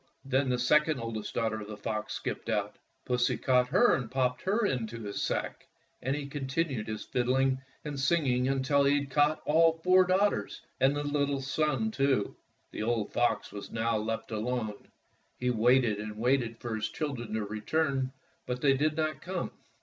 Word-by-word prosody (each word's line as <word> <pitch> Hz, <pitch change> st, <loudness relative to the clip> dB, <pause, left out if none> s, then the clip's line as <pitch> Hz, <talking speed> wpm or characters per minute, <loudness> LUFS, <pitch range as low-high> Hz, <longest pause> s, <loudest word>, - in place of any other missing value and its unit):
Then 135 Hz, 0 st, +1 dB
the 125 Hz, -, +1 dB
second 150 Hz, +4 st, +3 dB
oldest 115 Hz, -2 st, -5 dB
daughter 110 Hz, -1 st, 0 dB
of 105 Hz, -, -8 dB
the 105 Hz, -1 st, -7 dB
fox 110 Hz, 0 st, -3 dB
skipped -, -, -4 dB
out. -, -, -1 dB, 0.3 s
Pussy 125 Hz, -1 st, +1 dB
caught 125 Hz, -1 st, +3 dB
her 185 Hz, -, +4 dB
and 125 Hz, -4 st, -1 dB
popped 125 Hz, -1 st, 0 dB
her 210 Hz, +4 st, +1 dB
into 115 Hz, -, -2 dB
his 100 Hz, -1 st, -4 dB
sack, -, -, -3 dB, 0.3 s
and 130 Hz, +2 st, 0 dB
he 150 Hz, -1 st, -4 dB
continued 140 Hz, -3 st, -2 dB
his 110 Hz, -1 st, -5 dB
fid 120 Hz, -1 st, -1 dB
dling 130 Hz, +1 st, +2 dB, 0.2 s
and 145 Hz, -2 st, -4 dB
singing 135 Hz, -4 st, +2 dB
until 135 Hz, +1 st, +2 dB
he 140 Hz, +1 st, +4 dB
had 140 Hz, -1 st, -8 dB
caught 150 Hz, +2 st, +2 dB
all 165 Hz, +2 st, +5 dB
four 185 Hz, +1 st, +6 dB
daughters 190 Hz, +3 st, +1 dB, 0.2 s
and 135 Hz, +2 st, +4 dB
the 145 Hz, -, -2 dB
little 145 Hz, -1 st, 0 dB
son, 135 Hz, -4 st, 0 dB
too. 135 Hz, -4 st, +1 dB, 0.4 s
The -, -, -5 dB
old 110 Hz, -1 st, -1 dB
fox 115 Hz, -3 st, +1 dB
was 100 Hz, -, -7 dB
now 115 Hz, 0 st, 0 dB
left 115 Hz, +1 st, -3 dB
alone. 110 Hz, -1 st, -3 dB, 0.5 s
He 125 Hz, 0 st, 0 dB
waited 120 Hz, -2 st, +3 dB
and 105 Hz, 0 st, -6 dB
waited 120 Hz, -1 st, +1 dB
for 120 Hz, -1 st, -5 dB
his 110 Hz, 0 st, -2 dB
children 120 Hz, -8 st, -4 dB
to 110 Hz, -2 st, -1 dB
return, 130 Hz, +5 st, -1 dB, 0.4 s
but 125 Hz, 0 st, -3 dB
they 140 Hz, -2 st, +5 dB
did 150 Hz, +3 st, +1 dB
not 155 Hz, -2 st, -1 dB
come. -, -, -3 dB
130 Hz, 180 wpm, -30 LUFS, 115-145 Hz, 0.5 s, four